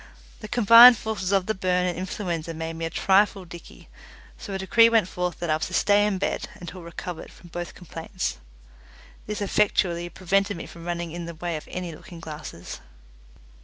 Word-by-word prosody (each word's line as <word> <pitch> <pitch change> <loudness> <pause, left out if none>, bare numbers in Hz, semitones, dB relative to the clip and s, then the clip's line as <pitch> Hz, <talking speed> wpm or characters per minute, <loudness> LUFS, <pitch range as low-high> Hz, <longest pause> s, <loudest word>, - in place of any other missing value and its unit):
The 215 - -8
combined 235 +2 +9
forces 205 -4 -3
of 195 -2 +2
the 220 - 0
burn 180 -2 0
and 180 -1 -1
influenza 175 -3 -4
made 160 +1 -4
me 165 0 -4
a - - -2
trifle 195 +1 +2
dicky, 170 0 -13 0.5
so 205 - -9
a 195 - -2
decree 230 +4 +5
went 225 -5 +3
forth 180 -1 -3
that 175 -2 -2
I - - +3
was 160 - -3
to - - -5
stay 205 0 +4
in 200 -2 -1
bed 190 - -2
until 180 +1 -9
recovered 170 0 -8
from 175 - -16
both 175 0 -6
complaints. 165 - -5 0.9
This 210 0 -4
effectually 180 -4 +1
prevented 195 +2 0
me - - -7
from 170 0 -12
running 175 -1 -3
in 170 +1 -6
the 170 - -7
way 170 +1 -3
of 155 - -7
any 180 -3 -5
looking 170 +2 -12
glasses. 150 - -8
180 Hz, 190 wpm, -25 LUFS, 170-200 Hz, 0.9 s, combined